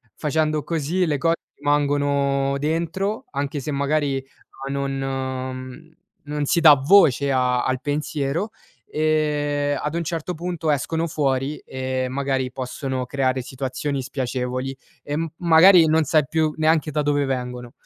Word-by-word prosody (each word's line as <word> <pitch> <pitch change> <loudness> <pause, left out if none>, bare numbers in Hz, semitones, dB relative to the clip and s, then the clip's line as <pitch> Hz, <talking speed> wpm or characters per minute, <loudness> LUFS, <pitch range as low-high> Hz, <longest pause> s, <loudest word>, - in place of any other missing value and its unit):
facendo 155 0 0
così 170 +3 0
le 150 -3 0
cose 165 +4 +2 0.2
rimangono 140 -1 +1
dentro, 170 +8 -2
anche 140 +1 -3
se 150 +3 -4
magari 140 0 0 0.5
a 140 - -3
non 135 +1 -4 0.3
non 150 0 -3
si 170 - +2
dà 155 -3 +9
voce 140 -2 +4
a 125 -1 +2
al 130 0 0
pensiero, 150 +5 -2 0.4
ehm, 145 -2 0
ad 150 +1 -3
un 170 - -1
certo 165 +1 -3
punto 170 -2 -2
escono 160 +4 -1
fuori 140 -2 -1
e 130 0 -3
magari 135 -1 -1
possono 130 0 -4
creare 130 -1 0
situazioni 135 +2 -3
spiacevoli, 130 0 -3 0.3
e 145 - -3
m 165 +1 -2
magari 170 +1 +7
non 160 0 +3
sai 155 +1 +3
più 155 -1 +1
neanche 155 -1 +2
da 150 +1 0
dove 145 -1 +1
vengono. 125 -2 -4
145 Hz, 140 wpm, -22 LUFS, 135-155 Hz, 0.5 s, dà